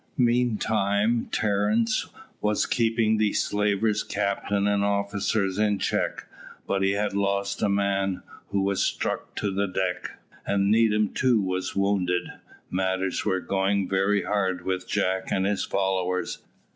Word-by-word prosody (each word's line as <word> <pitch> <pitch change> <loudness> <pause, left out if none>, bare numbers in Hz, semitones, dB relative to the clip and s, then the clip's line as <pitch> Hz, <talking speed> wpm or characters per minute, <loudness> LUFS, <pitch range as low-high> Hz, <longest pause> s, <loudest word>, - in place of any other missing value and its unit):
Meantime 115 -3 +1
Terence 105 +2 +1 0.3
was 105 0 +1
keeping 115 -2 +2
the 105 -1 +1
slaver's 105 +1 +1
captain 100 -1 -1
and 100 0 +2
officers 100 0 0
in 105 -1 +2
check, - - -1 0.4
but 100 - 0
he 95 0 +2
had 105 0 -1
lost 100 0 -1
a 105 - +2
man, 100 -1 0 0.2
who 100 -1 0
was 100 -1 0
struck - - -2
to 100 - -1
the 100 +1 0
deck, 95 -1 -3 0.3
and 100 0 +1
Needham 110 -2 +3
too 125 -3 +3
was 95 -1 -2
wounded. 100 -3 +1 0.4
Matters 95 0 -1
were 95 -3 +1
going 95 0 0
very 100 +1 +1
hard 95 -3 -1
with 95 -1 -2
Jack 95 0 0
and 95 - +1
his 100 0 0
followers. 95 -1 -1
100 Hz, 135 wpm, -26 LUFS, 95-105 Hz, 0.4 s, Needham